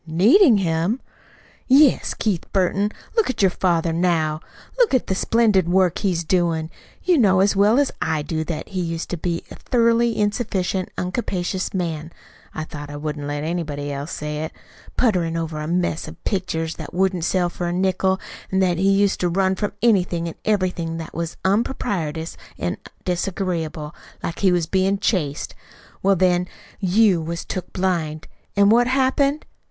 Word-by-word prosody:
"Needing 225 - +6
him!" 175 +5 0 0.7
"Yes. 275 +1 +5
Keith 200 -6 -2
Burton, 195 +1 +1 0.3
look 450 - +2
at 255 - -1
your 190 - +5
father 170 -2 +1
now. 165 -3 +1 0.4
Look 475 - +4
at 255 - +1
the - - -1
splendid 205 -3 +2
work 185 -2 +3
he's 180 -4 0
doin'. 165 -2 0 0.3
You 355 -5 +3
know 190 -5 +4
as 195 +1 +3
well 205 +4 +4
as 285 -1 +2
I 155 -2 0
do 160 +1 -2
that 165 -2 -5
he 185 -2 -2
used 165 -1 -3
to 175 - -2
be 170 +1 -2
a - - -7
thoroughly 235 -1 +2
insufficient, 200 -3 -1
uncapacious 185 -1 -2
man 165 -4 -3 0.4
(though 155 -1 -6
I 145 - -7
wouldn't 145 -1 -4
let 145 0 -3
anybody 150 -4 -3
else 140 +3 -5
say 150 0 -4
it!), 160 - -5 0.5
putterin' 175 -9 +1
over 160 -2 -3
a 150 - -4
mess 175 -1 -1
of - - -12
pictures 165 -5 -2
that - - -8
wouldn't 185 -2 +1
sell 180 +1 +1
for 175 0 -4
a - - -1
nickel. 190 +1 +1 0.3
An' 190 - 0
that 180 -3 +2
he 195 +1 +3
used 195 0 +3
to 175 - +1
run 190 +2 +2
from 205 +2 -2
anything 180 -7 +2
an' 165 - -5
everything 180 -5 0
that 165 -1 -7
was 170 0 -4
unpropitious 190 - -1 0.2
an' - - -2 0.3
disagreeable, 175 -4 -2 0.3
like 165 - -4
he 190 -2 +4
was 175 -2 +2
bein' 190 +3 +1
chased. 175 -8 -1 0.5
Well, 195 0 +4
then 180 0 +2 0.3
you 190 -2 +3
was 170 +1 -4
took 185 - -5
blind. 165 -5 -1 0.3
An' 200 0 +5
what 240 +2 +5
happened? 270 +3 +1
180 Hz, 170 wpm, -22 LUFS, 165-200 Hz, 0.7 s, Needing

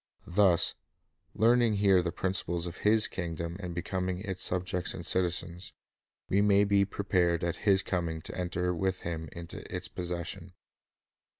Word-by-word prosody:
Thus, 90 -1 +3 0.6
learning 115 -1 +4
here 100 -2 +4
the 85 -1 -2
principles 85 -2 -1
of 85 +1 -6
His 110 +1 +3
kingdom 85 -1 -4
and 90 -3 -5
becoming 90 +1 -2
its 95 -1 -4
subjects 90 -1 0
and - - -6
citizens, 90 0 0 0.5
we 100 +2 +2
may 100 -1 +5
be 100 -1 +3
prepared 90 -4 0
at 85 -1 -1
His 95 -1 +5
coming 85 -4 -2
• - - -16
to - - -7
enter 90 0 -1
with 95 +2 -1
Him 80 -2 -4
into 85 -1 -8
its - - -3
possession. 85 -1 -3
90 Hz, 155 wpm, -30 LUFS, 85-100 Hz, 0.6 s, may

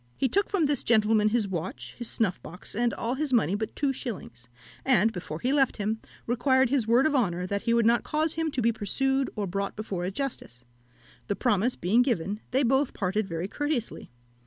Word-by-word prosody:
He 270 - +2
took 400 - +1
from 375 -6 +2
this 290 -1 +1
gentleman 215 -1 +3
his 220 -2 +1
watch, 155 -9 -5
his 240 - -4
snuff 205 -6 0
box, 180 +3 -8
and 235 +2 +1
all 235 +2 -2
his 290 +1 -2
money 220 -8 +3
but 215 +2 -3
two 280 -2 0
shillings, 155 - -7 0.3
and, 230 -4 +3
before 165 -3 -6
he 255 +3 +1
left 270 -3 +2
him, 215 +1 -1 0.3
required 260 +1 +2
his 260 -6 +1
word 240 +5 +4
of 310 - +2
honour 180 -8 +1
that 200 +2 -2
he 230 - +1
would 235 -1 +3
not 235 +1 +4
cause 310 +1 0
him 325 0 -1
to 260 -5 -2
be 235 - +4
pursued 265 +6 0
or 210 -2 -2
brought 195 +2 -3
before 195 -4 -4
a 180 - -1
justice. 190 - -5 0.6
The 200 - 0
promise 235 +1 +1
being 205 +8 +3
given, 210 -5 0
they 265 +2 +2
both 265 +2 +2
parted 195 +2 -1
very 165 0 -3
courteously. 290 0 -3
230 Hz, 205 wpm, -27 LUFS, 200-265 Hz, 0.6 s, word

